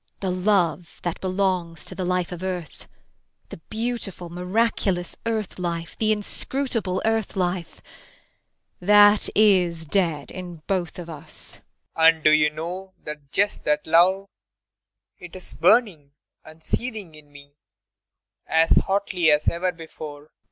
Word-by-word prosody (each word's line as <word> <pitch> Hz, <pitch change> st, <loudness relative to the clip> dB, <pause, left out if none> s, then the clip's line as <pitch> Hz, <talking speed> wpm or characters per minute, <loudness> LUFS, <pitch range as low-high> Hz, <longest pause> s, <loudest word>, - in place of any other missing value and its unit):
The 190 Hz, -2 st, -1 dB
love 180 Hz, -3 st, 0 dB
that 175 Hz, -2 st, -3 dB
belongs 185 Hz, -3 st, -1 dB
to -, -, -8 dB
the 185 Hz, 0 st, -4 dB
life 180 Hz, -1 st, 0 dB
of 175 Hz, -1 st, -6 dB
earth 180 Hz, -4 st, -5 dB, 0.6 s
the -, -, -9 dB
beautiful, 220 Hz, -6 st, -4 dB
miraculous 180 Hz, 0 st, 0 dB
earth 220 Hz, -5 st, -2 dB
life 170 Hz, -2 st, -4 dB
the 215 Hz, -1 st, +2 dB
inscrutable 215 Hz, -2 st, -2 dB
earth 225 Hz, -2 st, 0 dB
life 180 Hz, -2 st, -2 dB, 1.0 s
that 205 Hz, +2 st, +6 dB
is 180 Hz, -6 st, +3 dB
dead 160 Hz, -3 st, 0 dB
in 175 Hz, -4 st, -8 dB
both 185 Hz, -4 st, -2 dB
of 175 Hz, -2 st, -7 dB
us. 155 Hz, -3 st, -12 dB
PROFESSOR -, -, -31 dB
RUBEK. -, -, -52 dB
[Passionately.] 165 Hz, 0 st, +6 dB
And 160 Hz, -, -19 dB
do 155 Hz, -, +6 dB
you 155 Hz, 0 st, +5 dB
know 180 Hz, +5 st, -6 dB
that 150 Hz, -2 st, -8 dB
just 205 Hz, +1 st, 0 dB
that 150 Hz, 0 st, +1 dB
love 180 Hz, +4 st, +4 dB, 0.9 s
it 180 Hz, -1 st, -11 dB
is 185 Hz, -, -6 dB
burning 170 Hz, -, +2 dB, 0.3 s
and 155 Hz, +1 st, -15 dB
seething 220 Hz, -9 st, -3 dB
in 150 Hz, -1 st, -16 dB
me 145 Hz, 0 st, -15 dB, 0.9 s
as 160 Hz, 0 st, +4 dB
hotly 190 Hz, -4 st, +2 dB
as 150 Hz, 0 st, +3 dB
ever 180 Hz, +2 st, +1 dB
before? 160 Hz, -3 st, -9 dB
IRENE. 150 Hz, -, -21 dB
180 Hz, 145 wpm, -24 LUFS, 160-195 Hz, 1.0 s, that